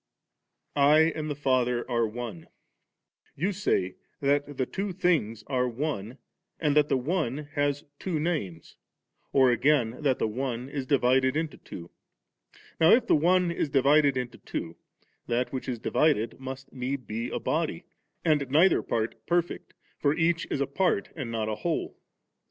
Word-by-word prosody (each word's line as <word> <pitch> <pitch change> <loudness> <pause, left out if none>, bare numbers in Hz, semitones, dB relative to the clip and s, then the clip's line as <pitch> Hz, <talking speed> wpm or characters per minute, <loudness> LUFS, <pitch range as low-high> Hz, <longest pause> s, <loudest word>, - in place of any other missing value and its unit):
I 150 +3 +5
and 155 -1 -3
the 145 - -2
Father 125 -4 +1
are 120 -2 +1
One 110 -5 -6
V - - -20 0.9
You 180 +8 0
say 95 - 0 0.2
that 145 +1 +1
theitwo 145 +8 -3
thin^ 155 - 0
are 125 -2 0
one, 120 -3 -4 0.4
or 155 - +1
that 150 0 +3
the - - +3
one 145 0 -2
has 145 -1 0 0.2
two 175 -5 -2
names, 145 - -3 0.5
or 130 -2 +5
again 125 -1 +2
that 135 -4 +2
the - - 0
one 125 +2 -3
is 140 -2 -4
divided 130 0 +3
into 160 -1 -3
two. 85 -1 -10 0.9
Now 160 +1 +6
if 235 0 +4
the - - +4
one 175 +3 +3
is 165 -3 -1
divided 140 0 +4
into 125 -2 -4
two, 85 0 -5 0.5
that 120 +2 -1
which 130 0 -4
is 125 - -2
divided 115 -2 +1
must 135 +1 -8
need 130 +1 -3
be 115 +3 -4
a - - -3
body, - - -1 0.4
and 150 -4 +2
neither 160 +8 +5
part 115 0 -3
perfect, 175 0 -1 0.2
for 145 +1 +2
each 165 0 +1
is - - -1
a - - +2
part 190 +8 0
and 135 -7 -5
not 110 -2 -2
a 110 -1 -2
whole. 170 -2 -2
140 Hz, 160 wpm, -27 LUFS, 120-155 Hz, 0.9 s, Now